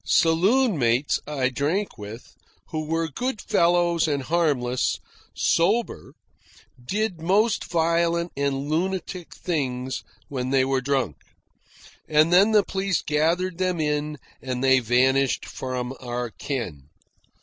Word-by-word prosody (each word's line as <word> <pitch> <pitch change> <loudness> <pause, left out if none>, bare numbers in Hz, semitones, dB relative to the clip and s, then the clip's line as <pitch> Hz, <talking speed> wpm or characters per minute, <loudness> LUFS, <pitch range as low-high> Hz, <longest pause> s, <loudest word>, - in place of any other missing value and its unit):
Saloon 190 - +3
mates 120 +3 +2
I 135 -4 0
drank 155 +10 -1
with, 105 +2 -10 0.4
who 155 -1 -3
were 165 +1 0
good 245 - -3
fellows 170 -2 +2
and 140 -3 -1
harmless, 135 -6 +1 0.4
sober, 210 +8 +1 0.7
did 195 - -2
most 200 +6 +2
violent 170 0 +1
and 140 0 -1
lunatic 180 +2 -3
things 130 -6 -3 0.2
when 130 -2 -3
they 135 -1 +3
were 135 -1 0
drunk. 130 - -1 0.9
And 155 +2 +4
then 195 +5 +6
the 210 -2 +5
police 190 -1 -1
gathered 170 +4 0
them 185 -2 0
in 150 0 -1 0.2
and 130 -1 -3
they 130 -1 +5
vanished 130 +2 +2
from 125 -1 -4
our 120 -1 -4
ken. 90 - -5
150 Hz, 120 wpm, -24 LUFS, 130-175 Hz, 0.9 s, then